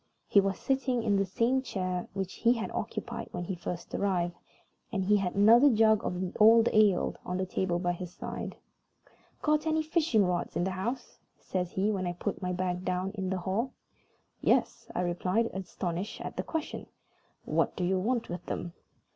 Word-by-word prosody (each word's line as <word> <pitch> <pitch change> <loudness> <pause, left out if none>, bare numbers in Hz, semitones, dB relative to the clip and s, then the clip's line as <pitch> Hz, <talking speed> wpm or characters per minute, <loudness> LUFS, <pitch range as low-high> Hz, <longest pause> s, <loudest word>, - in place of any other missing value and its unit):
He 200 - +6
was 195 -1 -1
sitting 260 -3 0
in 205 -2 +2
the 195 0 +1
same 235 +7 +1
chair 185 -7 -3
which 190 -1 -3
he 235 +1 +3
had 230 -2 -4
occupied - - -4
when 175 - -4
he 190 - -3
first 175 0 -6
arrived, 175 -3 0 0.6
and 195 -4 0
he 205 +2 +4
had 190 -3 -2
another 230 +7 +7
jug 220 -3 +4
of 180 - -2
the 185 0 -3
old 225 +2 +7
ale 210 -4 +4
on 180 - -3
the 185 - 0
table 185 -1 -1
by 175 0 0
his 175 0 -6
side. - - -6 0.9
"Got 305 +1 +2
any 315 0 +2
fishing 310 - +2
rods 180 -1 -1
in - - +1
the 190 - 0
house?" 225 +8 -4 0.2
says 180 -2 -3
he, 200 +3 +1
when 185 -3 -1
I 175 - -1
put 195 +3 -4
my 180 -1 -1
bag 180 0 -2
down 185 +1 -1
in 190 -3 -3
the 190 - 0
hall. 200 +8 -2 0.7
"Yes," - - +1
I - - +1
replied, 180 +6 0
astonished 185 0 -4
at - - -6
the - - -1
question. 320 -2 -4 0.6
"What - - +1
do 180 - -2
you 185 +1 +2
want 235 +4 0
with 175 0 -5
them?" 175 - -4
190 Hz, 190 wpm, -30 LUFS, 180-225 Hz, 0.9 s, another